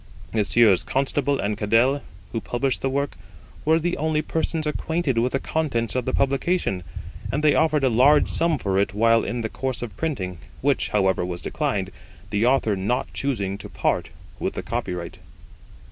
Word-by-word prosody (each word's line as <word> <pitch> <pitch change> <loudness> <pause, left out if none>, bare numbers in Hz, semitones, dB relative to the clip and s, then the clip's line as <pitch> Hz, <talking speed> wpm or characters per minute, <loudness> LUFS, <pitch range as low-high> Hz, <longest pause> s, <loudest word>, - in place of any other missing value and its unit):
Messrs. 110 -2 +4
Constable 140 +1 0
and 105 +1 0
Cadell, 120 +7 +2 0.3
who 115 - -2
published 125 +3 -1
the 135 - 0
work, 140 +1 -1 0.5
were 160 +1 +4
the 175 +2 -1
only 155 0 0
persons 160 0 -1
acquainted 150 -3 0
with 125 +2 0
the 135 - +1
contents 130 -9 -1
of 125 -2 -1
the - - 0
publication, 135 - 0 0.5
and 150 - -1
they 150 - +5
offered 155 -3 +2
a - - +5
large 130 +5 +5
sum 165 -2 +1
for 95 -6 0
it 100 0 0
while 115 +1 +4
in 120 0 -2
the 110 - -1
course 130 +2 -3
of 110 -7 -7
printing, 95 - -3 0.2
which, - - +1
however, 95 -3 +2
was 90 -1 -4
declined, 95 -2 -1 0.4
the 105 +3 +2
Author 125 -5 +3
not 105 +7 -1
choosing 100 -8 -2
to - - -8
part - - -1 0.3
with - - -2
the - - -4
copyright. 85 -1 -4
125 Hz, 175 wpm, -24 LUFS, 105-145 Hz, 0.5 s, they